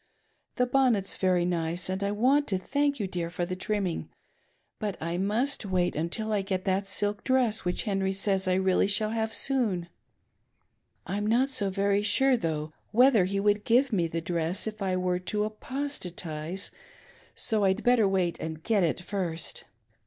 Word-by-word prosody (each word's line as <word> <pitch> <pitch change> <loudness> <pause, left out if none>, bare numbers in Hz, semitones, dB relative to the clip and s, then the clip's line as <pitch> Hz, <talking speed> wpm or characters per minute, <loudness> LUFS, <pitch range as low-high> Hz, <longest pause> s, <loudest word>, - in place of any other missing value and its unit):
The 250 - +2
bonnet's 245 -6 +2
very 180 -2 +2
nice 170 0 -1
and 190 +1 -2
I 200 - 0
want 265 +7 +3
to 190 - 0
thank 280 +7 0
you, 205 - -1
dear, 175 -3 -3
for 175 0 -2
the 185 +1 -4
trimming; 190 -2 -2 0.7
but 210 -3 -3
I 170 +2 -3
must 230 +9 0
wait 185 -3 0 0.2
till 220 +1 -1
I 205 - +2
get 190 -1 -3
that 195 +1 0
silk 205 +1 -1
dress 250 -6 +1
which 180 - -1
Henry 195 -2 0
says 195 0 0
I 185 - +3
really 190 0 +2
shall 215 +1 +2
have 220 -1 -1
soon. 220 -11 0 1.2
I'm 205 +4 -2
not 250 +5 +2
so 205 -6 0
very 200 +1 +1
sure 265 +6 +3
though 155 -6 -3 0.2
whether 240 -4 +5
he 195 +2 -1
would 205 +1 +2
give 250 +2 +3
me 175 -4 +2
the 165 0 -3
dress 170 +2 -1
if 215 -1 -6
I 185 -2 0
were 180 0 0
to 210 +3 -1
apostatise, 195 - -4 0.6
so 215 -2 0
I'd 190 +2 +2
better 245 -4 +4
wait 185 -3 0
and 160 0 -6
get 220 -3 +2
it 170 +1 0
first. 180 -4 -4
195 Hz, 175 wpm, -28 LUFS, 180-220 Hz, 1.2 s, whether